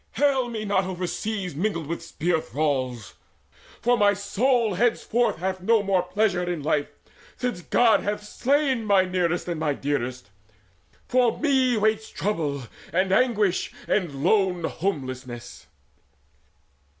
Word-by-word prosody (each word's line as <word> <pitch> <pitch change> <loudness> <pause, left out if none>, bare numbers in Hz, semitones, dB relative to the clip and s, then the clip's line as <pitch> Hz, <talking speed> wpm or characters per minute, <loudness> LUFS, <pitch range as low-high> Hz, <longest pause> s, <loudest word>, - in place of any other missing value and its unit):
Hale 265 -1 +2
me 220 -2 -4
not 200 -2 +1
overseas 185 0 -3
Mingled 170 -1 -1
with 165 +3 -4
spear 165 0 -1
thralls; 130 -8 -2 0.7
for 245 +1 +4
my 205 -1 +4
soul 220 +3 +1
henceforth 240 +3 +1
Hath 185 +1 -3
no 220 +2 +3
more 195 -2 +2
pleasure 185 +1 0
in 175 -4 -3
life, 150 -1 +1 0.5
since 245 -8 -2
God 225 +5 +4
hath 205 +1 -3
slain 265 +2 +1
My 200 -2 +4
nearest 180 -2 -1
and 170 -3 -3
my 150 -3 0
dearest! 125 -6 -3 0.8
For 250 -2 +2
me 260 -5 +2
waits 215 +1 +1
Trouble 155 -9 -2 0.3
and 185 +2 +1
anguish 210 -4 +2 0.2
and 150 -9 -1
lone 185 -2 +2
homelessness!" 130 -10 -4
190 Hz, 125 wpm, -25 LUFS, 160-220 Hz, 0.8 s, for